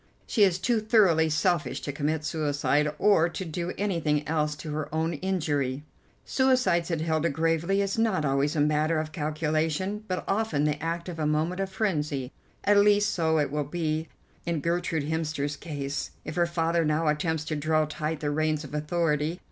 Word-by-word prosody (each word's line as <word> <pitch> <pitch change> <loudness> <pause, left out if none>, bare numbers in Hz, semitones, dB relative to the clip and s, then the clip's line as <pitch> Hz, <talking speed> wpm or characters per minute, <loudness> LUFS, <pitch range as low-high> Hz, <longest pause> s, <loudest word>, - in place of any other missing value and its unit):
She 225 - -1
is 185 -3 +4
too 230 +5 +1
thoroughly 195 -8 +4
selfish 155 -4 +1
to 140 - -3
commit 150 +2 -2
suicide, 150 -1 +1
or 190 -5 +4
to 185 - -5
do 170 +2 -3
anything 165 -7 0
else 150 -1 0
to 155 0 -7
her 150 0 -3
own 160 +2 0
injury." 145 -6 -1 0.4
"Suicide," 255 -11 +2
said 165 -3 -1
Hilda 160 0 +1
gravely, 165 +5 +1
"is 195 +2 -2
not 210 -9 +1
always 140 +2 +1
a 150 - +2
matter 155 +2 +2
of 155 0 -4
calculation, 155 +6 -1
but 185 -1 -2
often 200 -8 0
the 150 0 0
act 170 +2 -3
of 170 -3 -6
a 155 - +1
moment 160 +5 0
of 195 - -2
frenzy, 150 - -1 0.3
at 205 0 +4
least 205 +1 +4
so 160 -2 +1
it 145 -3 +1
will 150 0 0
be 155 +1 -2 0.4
in 170 -2 -1
Gertrude 170 0 -1
Hemster's 155 -2 -2
case 145 -3 -4 0.2
if - - -5
her 175 +1 +2
father 170 0 +1
now 155 +1 +1
attempts 155 +1 0
to 155 - -2
draw 155 +1 +1
tight 155 0 -4
the 145 -1 -1
reins 155 0 0
of 145 - -10
authority. 155 +1 0
160 Hz, 180 wpm, -27 LUFS, 150-175 Hz, 0.4 s, is